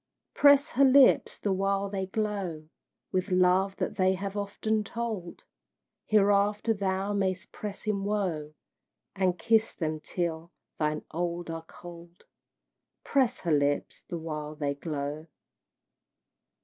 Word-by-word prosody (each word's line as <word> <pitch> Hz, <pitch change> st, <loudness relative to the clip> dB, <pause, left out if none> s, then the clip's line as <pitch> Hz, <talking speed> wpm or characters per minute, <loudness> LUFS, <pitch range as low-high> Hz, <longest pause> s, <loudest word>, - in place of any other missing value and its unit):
Press 285 Hz, +1 st, +6 dB
her 275 Hz, -2 st, +3 dB
lips 270 Hz, 0 st, +5 dB
the 200 Hz, -, -1 dB
while 195 Hz, +1 st, 0 dB
they 195 Hz, -1 st, -3 dB
glow 195 Hz, -7 st, -3 dB, 0.4 s
With 185 Hz, +2 st, -1 dB
love 185 Hz, +1 st, +3 dB
that -, -, -3 dB
they 190 Hz, -1 st, +3 dB
have 195 Hz, +1 st, -5 dB
often 210 Hz, +1 st, -1 dB
told, 220 Hz, -5 st, -5 dB, 0.6 s
Hereafter 205 Hz, +1 st, +3 dB
thou 195 Hz, 0 st, -1 dB
mayst 190 Hz, -2 st, -1 dB
press 210 Hz, -1 st, -7 dB
in 205 Hz, -2 st, -1 dB
woe, 180 Hz, -8 st, -2 dB, 0.6 s
And 185 Hz, -2 st, +1 dB
kiss 225 Hz, 0 st, +2 dB
them 155 Hz, -2 st, -3 dB
till 170 Hz, 0 st, -4 dB, 0.3 s
thine 150 Hz, 0 st, 0 dB
own 175 Hz, +1 st, -2 dB
are 165 Hz, 0 st, -6 dB
cold. 175 Hz, 0 st, -13 dB, 0.8 s
Press 260 Hz, -3 st, +2 dB
her 170 Hz, -, -1 dB
lips 145 Hz, -1 st, 0 dB
the 170 Hz, -, -3 dB
while 155 Hz, -2 st, -5 dB
they 145 Hz, -2 st, -1 dB
glow! 150 Hz, +1 st, -5 dB
190 Hz, 125 wpm, -28 LUFS, 165-210 Hz, 0.8 s, Press